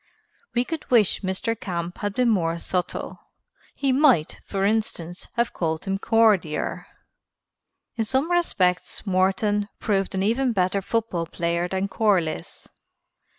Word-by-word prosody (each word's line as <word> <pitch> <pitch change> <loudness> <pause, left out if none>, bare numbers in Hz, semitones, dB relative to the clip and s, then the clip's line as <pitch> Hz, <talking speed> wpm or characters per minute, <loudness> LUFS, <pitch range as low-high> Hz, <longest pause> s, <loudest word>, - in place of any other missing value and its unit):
We 240 +1 +2
could 320 +1 -5
wish 225 -6 +4
Mr. 190 +4 -1
Camp 175 -1 -4
had 205 -1 -3
been 250 -1 +2
more 170 -5 +1
subtle. 180 +1 -3 0.6
He 275 -2 +1
might, 260 - +3
for 195 0 -1
instance, 195 -5 -2
have 235 0 0
called 160 -2 -2
him 195 0 -1
Cordier. 215 -9 +2 1.1
In 225 - 0
some 265 +9 0
respects 195 - +1
Morton 200 +2 +1
proved 195 -2 0
an 190 - 0
even 240 +4 +1
better 190 0 +1
football 195 -5 -1
player 170 +1 -1
than 190 +2 -1
Corliss. 190 - 0
195 Hz, 130 wpm, -24 LUFS, 180-225 Hz, 1.1 s, wish